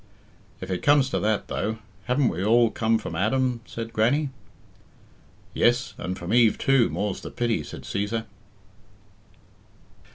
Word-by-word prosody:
"If - - -6
it 90 - -2
comes 145 -2 +4
to - - 0
that, 110 -1 0
though, 110 +1 -2 0.3
haven't 125 +1 +2
we 90 +2 -3
all 115 +2 +4
come 115 +1 +1
from - - -6
Adam?" 125 +3 0
said 115 0 -6
Grannie. 135 +6 +2 1.2
"Yes; 120 +2 +2
and 90 +1 -4
from 85 +4 -4
Eve 115 -3 +5
too, 135 -3 +3
more's 100 -2 -3
the - - -7
pity," 120 -7 -1
said 75 - -9
Cæsar. 110 +3 -2
115 Hz, 140 wpm, -25 LUFS, 105-125 Hz, 1.2 s, Eve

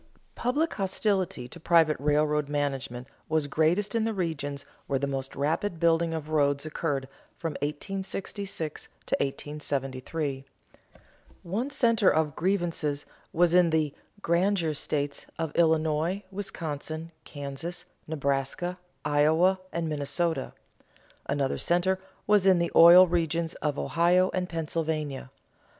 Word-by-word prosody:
_ - - -32 0.3
Public 290 +7 0
hostility 190 - -1
to 150 - -11
private 160 -2 +4
railroad 150 0 +1
management 135 -4 -2 0.2
was 155 -1 +1
greatest 160 +9 +1
in 230 -1 +1
the 225 -1 -1
regions 145 -6 -3 0.2
where 140 - +1
the 140 - -1
most 135 -1 -4
rapid 160 +6 -1
building 165 0 +3
of 160 -2 -4
roads 145 -2 +2
occurred 145 -3 -2 0.3
from 165 - -3
1866 190 +2 -4 0.2
to - - +1
1873. 140 0 -3 1.0
One 215 +10 -2
center 230 -7 +3
of 155 -2 +1
grievances 170 -6 -1 0.3
was 175 0 +3
in 180 -1 +5
"the 155 -3 +1 0.3
granger 170 -1 +2
states" 145 -1 -2
of 160 -2 -3
Illinois, 160 +3 +2
Wisconsin, 160 -4 -5
Kansas, 145 +5 -6 0.2
Nebraska, 145 +4 -1 0.3
Iowa, 160 +6 +3
and 170 -1 -2
Minnesota; 150 0 -1 0.7
another 140 -1 0
center 180 +2 +1 0.3
was 205 -2 +4
in 190 -2 +6
the 170 0 0
oil 175 +2 +10
regions 170 -1 0
of 150 -2 -1
Ohio 180 +2 +3
and 180 -1 -1
Pennsylvania. 155 -4 -2
160 Hz, 120 wpm, -28 LUFS, 145-180 Hz, 1.0 s, oil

